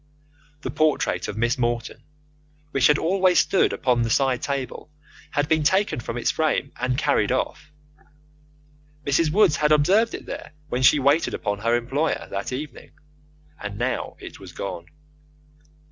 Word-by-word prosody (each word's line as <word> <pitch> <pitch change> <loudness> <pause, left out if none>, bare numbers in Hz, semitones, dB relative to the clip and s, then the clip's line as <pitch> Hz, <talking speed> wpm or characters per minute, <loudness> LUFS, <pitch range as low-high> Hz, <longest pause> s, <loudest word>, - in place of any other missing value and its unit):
The - - -4
portrait 155 -1 +1
of 105 - -6
Miss 120 +4 0
Morton, 120 -1 -2 0.7
which 135 - +4
had 150 - +4
always 185 +1 +2
stood 190 - +3
upon 125 -2 +1
the 115 - 0
side 130 +1 +1
table, 140 +1 -4 0.4
had 145 0 0
been 160 0 +2
taken 190 +2 +2
from 115 0 -5
its 120 - +1
frame, 155 -3 0
and 125 0 -1
carried 140 -8 +1
off. 150 +3 -2 1.3
Mrs. 145 +3 +2
Woods 190 -4 +4
had 150 0 +2
observed 190 +10 +3
it - - -9
there - - -8 0.2
when 125 - -1
she 130 +4 +6
waited 145 +4 +2
upon 100 -1 -3
her 115 +2 +1
employer 135 +7 -1
that 100 +4 -4
evening, 145 +4 -7 0.7
and 100 0 -6
now 120 +3 -2
it - - -10
was - - -11
gone. 85 - -6
140 Hz, 155 wpm, -23 LUFS, 120-155 Hz, 1.3 s, she